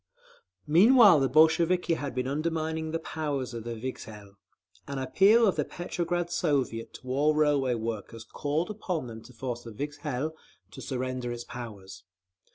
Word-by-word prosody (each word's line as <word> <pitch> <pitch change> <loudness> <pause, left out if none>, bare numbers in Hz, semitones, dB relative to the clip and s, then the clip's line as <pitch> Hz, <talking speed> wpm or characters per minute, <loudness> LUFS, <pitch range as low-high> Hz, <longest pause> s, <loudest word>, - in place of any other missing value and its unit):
Meanwhile 200 - +7
the 135 -1 +1
Bolsheviki 165 +4 +4
had 145 -5 -4
been 125 0 -1
undermining 160 +2 -2
the 165 - -1
power 150 -4 -3
of 130 - -7
the 115 0 -5
Vikzhel. 110 -4 -8 0.5
An 140 - -4
appeal 195 - +4
of 195 - +1
the - - +2
Petrograd 175 0 -3
Soviet 135 -9 -1
to 130 - -11
all 145 +4 +2
railway 145 -4 +2
workers 115 0 -5
called 150 - -2
upon 180 -8 -3
them 115 -2 -8
to 120 - -15
force 120 -1 -5
the 120 - -10
Vikzhel 145 +3 -4 0.4
to - - -10
surrender 130 -2 -3
its 120 0 -5
powers. 100 -7 -9
140 Hz, 155 wpm, -28 LUFS, 120-160 Hz, 0.5 s, Meanwhile